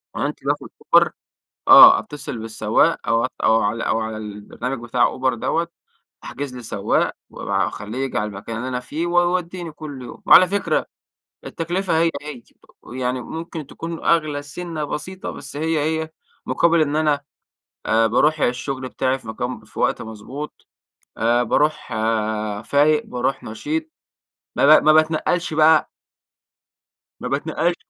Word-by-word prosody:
عنت - - -3
باخد - - -2 0.2
أوبَر. - - +6 0.6
آه، 365 +1 +10
أتّصِل 145 - -7
بالسواق 110 +7 +1
أو 115 0 +2
ع - - +1 0.2
أو 110 0 +4
على 105 +3 -1
أو - - 0
على 110 -1 -4
البرنامج 110 +5 -6
بِتاع 120 +1 +1
أوبَر 130 0 0
دَوَّة، 165 +8 -1 0.6
أحْجِز 140 -3 -6
لي 125 - -8
سَوَّاق - - 0 0.2
واب - - -8
أخَلّيه 105 +4 -2
ييجي 135 -1 -2
عَلى 105 - -1
المَكَان 105 +2 -7
اللي 125 +3 -4
أنَا 125 -1 -2
فيه، 155 +6 -4
ويوَدّيني 175 0 0
كل 145 -3 -8
يوم. 120 - -10
وعَلى 185 - +8
فِكرة، 200 +2 0 0.6
التكلفة 175 +1 -1
هي 165 0 +3
هي، 150 -5 -8 0.5
يعني 125 0 -2
مُمْكِن 160 +3 -7
تكون 165 +3 -7
أغْلى 155 -3 +1
سِنَّة 160 +1 -5
بسيطة، 185 +6 -5
بس - - -8
هي 160 +1 0
هي 160 +1 -1 0.4
مُقابِل 170 -1 +3
إنّ 150 -1 +1
أنا، 150 -2 +2 0.7
آآ، 115 0 +3
باروح 150 +7 +2
الشُّغْل 130 +1 -2
بتاعي 130 +1 -1
في 120 - -14
مكان 125 +3 -5
في - - -14
وقت - - +1
مَضْبوط، 110 +7 -8 0.5
آآ، 120 +2 +2
باروح 150 +3 0
آآ، 110 -2 -1
فايق، 150 +5 +2
باروح 125 +2 -2
نَشيط. 310 - -4 0.7
ما - - +7
ب - - -8
ما 155 - +6
باتنقّلش 155 +2 +1
بقى 155 0 +5 1.3
ما - - -5
باتنقّلش 175 +1 -1
145 Hz, 150 wpm, -21 LUFS, 115-160 Hz, 1.3 s, آه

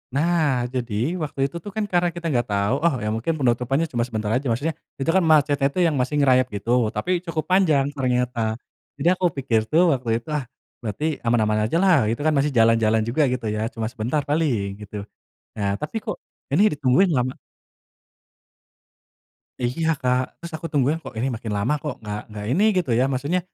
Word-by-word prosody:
Nah, 150 -5 +2
jadi 125 -4 -3 0.3
waktu 145 -2 -5
itu 140 - -5
tuh 205 - -7
kan 215 -1 0
karena 175 -3 +1
kita 170 0 -8
nggak 120 -1 +1
tahu, 100 +4 +1
"Oh, 165 - +3
ya 105 - -1
mungkin 115 +8 -3
penutupannya 130 +3 +1
cuma 120 - 0
sebentar 110 -3 -2
aja." 130 +4 0
Maksudnya 140 +8 0 0.2
itu 135 +4 -2
kan 190 - +5
macetnya 145 -3 +3
tuh 180 +6 -1
yang 160 - +2
masih 130 +4 -1
ngerayap 130 -2 +4
gitu, 115 +2 +1
tapi 180 +8 -1
cukup 160 -3 -3
panjang 160 -8 +4
ternyata, 125 -4 0 0.4
jadi 145 +4 -1
aku 185 0 -1
pikir 125 -4 +1
tuh 160 +3 +4
waktu 125 -3 -3
itu, 115 - -11
"Ah, 150 -2 0 0.4
berarti 110 +6 -3 0.2
aman-aman 110 -2 +2
ajalah," 180 +6 +3 0.2
gitu 115 - -2
kan, 155 - +3
masih 140 +2 +2
jalan-jalan 115 -1 +4
juga 120 +7 0
gitu 125 -2 -3
ya, 110 - -2
cuma 115 -3 -4
sebentar 125 +6 -1
paling 115 -10 0
gitu. 105 0 -7 0.5
Nah, 100 -2 0
tapi 150 +8 -5
kok - - -3 0.4
ini 180 +8 +5
ditungguin 150 +7 +3
lama 125 +1 0 2.3
Iya, 130 +7 -1
Kak. 125 0 +2 0.2
Terus 170 -1 -9
aku 155 +1 -5
tungguin, 145 +2 +2
"Kok - - -8
ini 125 - 0
makin 110 -1 -6
lama 110 +9 +1
kok 150 -4 -3
nggak 105 -1 -4
nggak 105 -1 -6
ini 185 +9 +2
gitu 170 -9 0
ya, - - +4
maksudnya 140 +8 0
130 Hz, 185 wpm, -23 LUFS, 115-155 Hz, 2.3 s, kan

